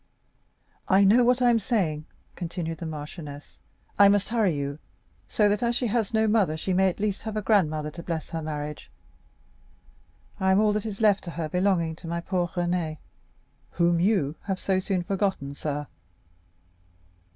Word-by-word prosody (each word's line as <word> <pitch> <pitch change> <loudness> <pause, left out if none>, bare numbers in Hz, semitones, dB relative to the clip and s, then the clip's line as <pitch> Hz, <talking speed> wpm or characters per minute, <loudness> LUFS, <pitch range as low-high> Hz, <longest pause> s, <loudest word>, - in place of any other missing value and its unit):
"I 195 +1 +5
know 220 +6 +6
what 250 +1 +3
I 245 - +6
am 230 - +3
saying," 180 - -1 0.3
continued 165 -2 -4
the 165 - -5
marchioness; 150 -1 -8 0.4
"I 200 -1 +8
must 200 0 +2
hurry 220 -8 +2
you, 140 +1 -4 0.5
so 210 - +2
that, 205 0 +1
as 235 0 +1
she 245 - 0
has 225 -2 0
no 220 -1 +2
mother, 205 -8 +2
she 185 +4 -2
may 190 +1 +4
at 180 - -7
least 205 -1 -1
have 215 0 -5
a - - 0
grandmother 155 -7 +1
to 170 - -8
bless 165 -2 -4
her 165 - -3
marriage. 150 -1 -5 1.5
I 190 0 +2
am 190 - +4
all 210 -1 +3
that 210 +1 -2
is 210 0 -6
left 210 -3 +4
to - - -5
her 165 -1 -4
belonging 180 -2 +1
to 170 - -10
my 170 +1 -2
poor 175 0 -1
Renée, 175 -3 -2 0.8
whom 170 0 +2
you 180 -6 +2
have 190 -2 -1
so 190 -1 +1
soon 185 -1 -1
forgotten, 190 -7 -1
sir." 145 0 -4
185 Hz, 175 wpm, -26 LUFS, 160-205 Hz, 1.5 s, I